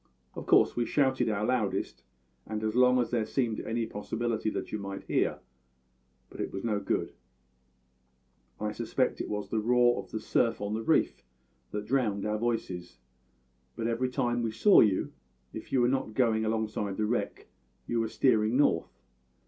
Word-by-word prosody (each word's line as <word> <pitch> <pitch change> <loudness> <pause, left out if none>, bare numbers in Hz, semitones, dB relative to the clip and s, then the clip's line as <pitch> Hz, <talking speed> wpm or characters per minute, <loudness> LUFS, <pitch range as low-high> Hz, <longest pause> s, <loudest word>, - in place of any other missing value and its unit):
Of - - -8
course - - +5
we 120 -1 0
shouted 130 -4 +2
our 105 0 -1
loudest, 120 -5 -1 0.5
and 110 0 -4
as 110 0 0
long 125 0 +5
as 120 - -1
there 120 -2 +1
seemed 115 -1 -1
any 115 0 -2
possibility 110 +1 -2
that - - -5
you 110 - -3
might 100 -1 -6
hear; - - 0 0.9
but - - -7
it - - -3
was 95 - -5
no 110 -3 0
good. 100 - -2 1.5
I 105 0 -2
suspect 120 +4 -1
it - - -5
was 105 -1 -4
the 110 - 0
roar 120 +2 +3
of - - -16
the 110 - -4
surf 115 +1 +1
on 105 +1 -3
the 110 - -2
reef - - +1 0.5
that 105 0 -4
drowned 110 -5 0
our 105 0 -1
voices. 95 -7 -3 0.8
But 115 - -4
every 120 +2 0
time 120 -1 0
we 115 -1 -1
saw 200 - +6
you, 100 -4 +1 0.4
if - - -8
you 130 - +3
were 120 - +4
not 130 -4 -1
going 110 -3 +2
alongside 110 -3 -2
the 110 - +1
wreck 120 +3 -2 0.4
you 120 - -1
were 115 - 0
steering 110 0 +2
north. 85 - +1
110 Hz, 175 wpm, -29 LUFS, 105-120 Hz, 1.5 s, saw